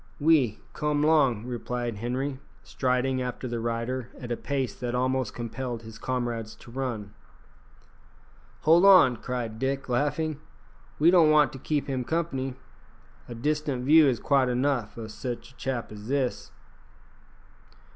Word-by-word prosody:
"Oui. 145 -8 +3
Come 150 -1 0
'long," 135 -8 +3
replied 120 -2 -3
Henri, 130 +5 -3 0.2
striding 130 0 0
after 125 0 -4
the 120 -1 -3
rider 115 +2 -3
at 120 -2 -7
a - - +1
pace 135 -2 -2
that 120 0 -4
almost 130 -1 0
compelled 120 0 -5
his 110 0 -11
comrades 120 -4 -3
to 120 - -15
run. 115 -6 -4 1.5
"Hold 165 +3 +5
on!" 185 -11 +7
cried 115 -2 -4
Dick, 135 +1 -1
laughing; 145 +4 0 0.6
"we 165 +3 +5
don't 170 -4 +6
want 150 -1 +4
to 135 - -8
keep 150 +2 -1
him 130 -3 -2
company. 135 -4 -2 0.7
A 120 - -6
distant 145 0 -1
view 155 +1 +7
is 125 -4 +1
quite 135 -3 +2
enough 125 -4 0
o' 115 - -5
sich 120 +3 -6
a - - -23
chap 125 -4 -3
as 105 0 -9
that." 125 -7 -1
130 Hz, 145 wpm, -27 LUFS, 120-145 Hz, 1.5 s, on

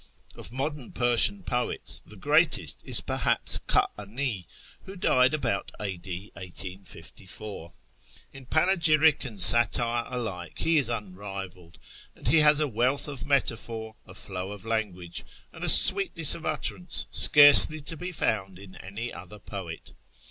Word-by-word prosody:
Of - - -10
modern 135 0 -7
Persian 120 - +3
poets 125 -5 -1
the 105 - -18
greatest 145 - -1
is - - +1
perhaps - - 0
Ka'ani, 105 -1 -3 0.4
who 195 - -12
died 130 -6 +1
about 115 -9 -4
a.d. 95 0 -8
1854. 95 0 -11 0.6
In 135 -2 -14
panegyric 160 -2 +1
and 110 -6 -8
satire 120 +2 +5
alike 110 -9 -8
he 165 -1 0
is 135 - +1
unrivalled; 95 -5 -9 0.4
and - - -11
he 155 +5 +3
has 150 -1 +5
a 150 - -1
wealth 130 +4 -2
of 140 -1 -9
metaphor, 115 -5 -4
a - - -15
flow 95 0 -8
of 105 0 -12
language, 100 -6 -5 0.3
and - - -12
a - - 0
sweetness 270 - +6
of 165 - -8
utterance 175 +3 +1
scarcely 150 +1 +7
to 145 +3 -9
be 180 +3 -8
found 95 - -4
in 95 -1 -15
any 105 +5 -9
other 95 +4 -13
poet. 95 -5 -11
115 Hz, 135 wpm, -25 LUFS, 95-145 Hz, 0.6 s, scarcely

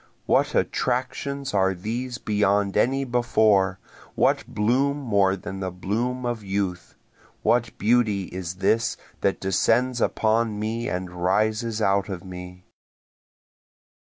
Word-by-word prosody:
What - - +2
attractions 135 +2 -1
are 95 -1 +2
these 120 +6 -4
beyond 105 -3 +1
any 135 +5 +2
before? 110 -6 +2 0.4
what - - +2
bloom 130 +7 +1
more 100 -8 +2
than 95 0 -7
the 95 -1 -2
bloom 115 +8 -2
of 120 -3 -2
youth? 95 -3 -3 0.5
What 120 -1 +1
beauty 110 -3 +2
is 90 -1 -6
this 115 +4 +1 0.2
that 100 - 0
descends 120 +6 +1
upon 110 -1 +1
me 115 +2 -2
and 90 0 -4
rises 110 +4 +1
out 100 0 +2
of 95 -3 -5
me? 90 0 -9
105 Hz, 120 wpm, -24 LUFS, 95-120 Hz, 0.5 s, What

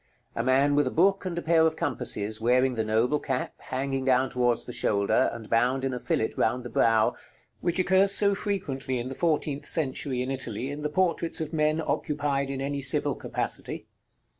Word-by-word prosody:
A 115 - -1
man 135 +3 +3
with 145 +1 +3
a - - +1
book 195 +3 +2
and 175 -2 -3
a 170 - -3
pair 165 0 +4
of 160 - -2
compasses, 110 -7 -2
wearing 125 +2 +3
the 115 -2 -1
noble 115 +7 +1
cap, 130 -3 -3
hanging 135 0 -3
down 130 0 +2
towards 120 -2 +1
the 125 - -7
shoulder, 100 -3 +2
and 115 -2 -8
bound 125 +4 +1
in 135 - -1
a 125 - -3
fillet 110 - -1
round 125 +3 0
the 125 - -8
brow, 110 -1 +3 0.5
which 175 0 -1
occurs 190 +2 +4
so 200 0 +4
frequently 145 -11 -3
during 125 +1 -3
the - - -5
fourteenth 150 -2 -1
century 130 -4 -1
in 130 - -3
Italy 130 -1 -3
in 145 +1 -6
the 150 - -1
portraits 170 +1 0
of 160 0 -4
men 155 0 +1
occupied 145 -3 -1
in 135 -1 -4
any 140 +1 -2
civil 135 0 +1
capacity. - - -4
135 Hz, 195 wpm, -27 LUFS, 125-155 Hz, 0.5 s, pair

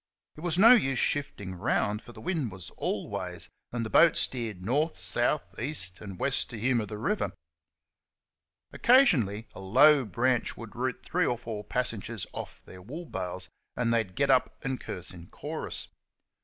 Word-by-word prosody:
It - - -12
was 170 -1 +1
no 225 +5 +9
use 135 - +4
shifting 110 -11 -1
round, 105 +3 0
for - - -13
the - - -12
wind 160 - -1
was 90 -4 -7
all - - -3
ways, - - -4 0.2
and 120 -1 -2
the - - -4
boat 170 - +6
steered 110 -8 -1
north, 150 +8 +1
south, 120 +10 +2 0.2
east, 115 -9 -1
and 100 -3 -8
west 140 +6 +1
to 115 - -7
humour 120 -2 +1
the 105 - -6
river. 200 - -1 1.4
Occasionally 125 - +4
a - - -10
low 135 +9 +6
branch 120 +3 0
would 115 -2 -9
root 130 +1 -2
three 180 0 +1
or 120 - 0
four 110 -3 -6
passengers 110 -3 -3
off - - -7
their 95 - -12
wool 150 - -7
bales, 95 - -4 0.3
and 115 -1 +1
they'd 110 -6 0
get 140 +4 +3
up 130 -1 +2
and 130 -1 -2
curse 90 -2 -4
in 85 -2 -12
chorus. - - -5
120 Hz, 170 wpm, -29 LUFS, 100-140 Hz, 1.4 s, no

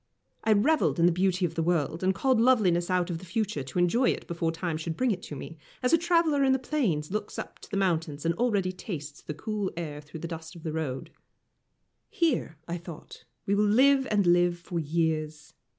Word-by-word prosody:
I 220 - +4
revelled 255 - +2
in 170 - +5
the 175 - +5
beauty 185 +1 +1
of 165 - -3
the 165 - -1
world, 165 -1 0
and 190 0 +2
called 255 +2 +2
loveliness 195 -9 +3
out 180 -1 +1
of 165 - -3
the - - -13
future 210 -3 -2
to 130 +5 -7
enjoy 205 +9 +3
it - - -2
before 170 -1 -1
time 165 -1 -3
should 160 0 -4
bring 255 -2 +2
it 185 -3 -2
to 150 - -8
me, 155 +3 -9 0.2
as 250 - +2
a - - +8
traveller 335 -4 +3
in 265 -1 +4
the - - +3
plains 215 - -1
looks 210 0 -3
up - - -7
to - - -13
the 200 - -2
mountains, 165 -6 0
and 165 - +2
already 200 -3 +1
tastes 155 -7 -7
the 150 - -6
cool 210 +3 -2
air 150 -3 -5
through 155 +2 -10
the 170 - -4
dust 160 -1 -8
of 165 - -12
the 155 - -3
road. 145 -5 -4 1.0
Here, 295 - 0
I 170 +1 -3
thought, 170 -2 -11 0.2
we 200 - +1
will 205 +1 +3
live 265 +5 +4
and 205 -2 +2
live 175 0 +4
for 170 0 -4
years. 155 -1 -2
175 Hz, 220 wpm, -28 LUFS, 160-215 Hz, 1.0 s, a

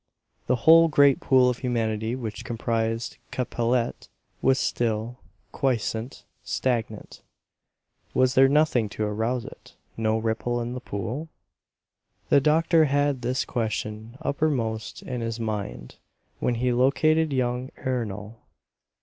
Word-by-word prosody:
The 125 - +3
whole 165 +1 +8
great 140 -3 +4
pool 130 -1 +4
of 125 -1 0
humanity 115 -2 -1
which 115 -4 -6
comprised 115 0 -2
Capellette 120 -1 -1 0.3
was 135 0 +3
still, 115 0 -1 0.3
quiescent, 120 -2 -2 0.2
stagnant. 115 -4 -3 0.9
Was 130 0 +3
there 135 0 +6
nothing 140 -7 +2
to 110 - 0
arouse 110 +4 -1
it, - - -13 0.2
no 110 0 +1
ripple 115 +2 -1
in 120 +1 -3
the 125 - -4
pool? 125 +10 -5 1.0
The 140 - +5
doctor 160 +2 +4
had 145 -2 +1
this 125 +2 -1
question 110 0 -4
uppermost 125 -7 -1
in 125 -2 -4
his 115 0 -3
mind 100 - -5 0.4
when 120 - 0
he 125 +2 0
located 155 +5 +3
young 125 -1 -1
Ernol. 115 -3 -4
120 Hz, 120 wpm, -25 LUFS, 110-130 Hz, 1.0 s, whole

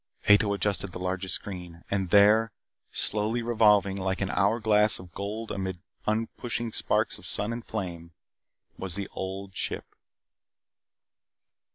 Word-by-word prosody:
Ato 105 0 +6
adjusted 100 -2 -1
the - - -6
largest 95 +1 0
screen. 90 -3 -8
And 95 -2 0
there, 105 +4 +5 0.4
slowly 110 +3 +2
revolving 105 -4 +4
like 95 0 -1
an 100 -2 -1
hour 100 +5 +2
glass 105 -1 +3
of 90 -1 -12
gold 105 +3 -5
amid 95 -2 -3 0.3
uprushing 115 +1 -2
sparks - - 0
of - - -8
sun 105 +3 0
and 115 0 -6
flame, 85 -7 -5 0.7
was 95 -3 -2
The 100 -1 -2
Old 95 0 -6
Ship. - - -2
100 Hz, 135 wpm, -28 LUFS, 95-110 Hz, 0.7 s, Ato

